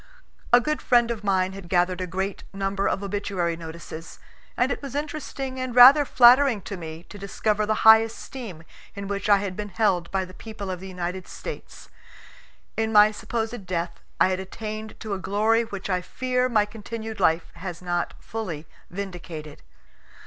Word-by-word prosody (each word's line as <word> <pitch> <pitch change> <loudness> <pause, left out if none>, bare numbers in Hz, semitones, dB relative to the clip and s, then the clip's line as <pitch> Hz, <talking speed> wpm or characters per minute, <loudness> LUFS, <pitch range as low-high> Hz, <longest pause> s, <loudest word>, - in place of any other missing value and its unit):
A 240 - +8
good 305 +4 -2
friend 240 -2 +3
of 220 -3 -5
mine 190 -2 +1
had 190 -3 -10
gathered 180 0 +2
a 185 - -2
great 190 +2 -3
number 195 0 -1
of 200 - -2
obituary 195 -4 -1
notices, 165 0 -9 0.4
and - - +2
it - - -3
was 275 -2 -7
interesting 285 -3 -4
and 255 -2 -3
rather 270 +4 +9
flattering 250 -3 +6
to 200 - -5
me 160 -2 -8
to 205 - -10
discover 210 +1 -1
the 215 0 0
high 220 0 +11
esteem 225 -5 -7 0.3
in 200 -1 -5
which 200 +1 -3
I 205 - +7
had 195 -2 -3
been 210 +1 -5
held 180 -3 +1
by 190 -1 -1
the 185 - -13
people 205 -2 -7
of 180 - -4
the 190 - -8
United 180 0 -5
States. - - -8 0.9
In 220 0 0
my 210 0 +7
supposed 220 -1 -4
death 170 -1 -3 0.2
I - - +5
had 185 0 -1
attained 215 +3 -6
to 215 -2 -4
a 195 - -3
glory 215 +4 +2
which 200 -3 -6
I 185 -2 0
fear 255 +6 -1
my 215 -4 +3
continued 220 +1 -7
life 165 -2 +2
has 180 -2 -6
not 175 -1 -2
fully 180 -9 -5 0.2
vindicated. 175 -5 -7
200 Hz, 180 wpm, -25 LUFS, 185-225 Hz, 0.9 s, high